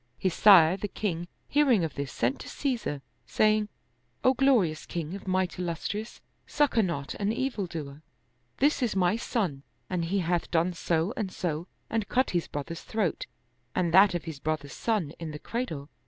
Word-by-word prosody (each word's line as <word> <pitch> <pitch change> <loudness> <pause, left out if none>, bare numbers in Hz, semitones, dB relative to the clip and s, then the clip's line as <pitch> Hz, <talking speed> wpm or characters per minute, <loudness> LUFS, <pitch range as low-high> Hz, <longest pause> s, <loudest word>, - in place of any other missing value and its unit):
His 185 -3 0
sire 185 -4 +7
the 205 - -3
king 175 -4 -3 0.2
hear 295 0 +3
ing 215 -8 +4
of 160 - -2
this 140 -1 -4
sent 120 +3 0
to - - -8
Caesar, 235 - -2 0.2
saying, 215 -1 +2 0.3
" 120 0 -42
O 260 - +5
glorious 245 - +2
king 170 -1 -4
of 195 0 -8
might 185 -1 0
illustrious, 180 +5 -4 0.3
succor 290 -6 +2
not 170 -8 -2
an 205 +1 +1
evil 230 -5 -2
doer. 150 -4 -7 0.6
This 285 +1 +2
is 235 -5 0
my 185 +1 +3
son 200 - -2 0.3
and 175 -2 0
He 190 +4 0
hath 175 -2 0
done 170 +2 +1
so 170 +3 0
and 195 -4 -3
so 170 -1 -3 0.2
and 220 -2 -2
cut 260 +1 +2
his 175 -3 0
brother's 145 +4 -5
throat 215 -7 -2 0.5
and 175 -3 +1
that 190 0 +7
of 175 - -2
his 160 -4 -7
brother's 150 -2 -3
son 205 -10 -1
in 165 -2 -5
the 150 - -6
cradle." 160 - -4
180 Hz, 185 wpm, -28 LUFS, 160-215 Hz, 0.6 s, sire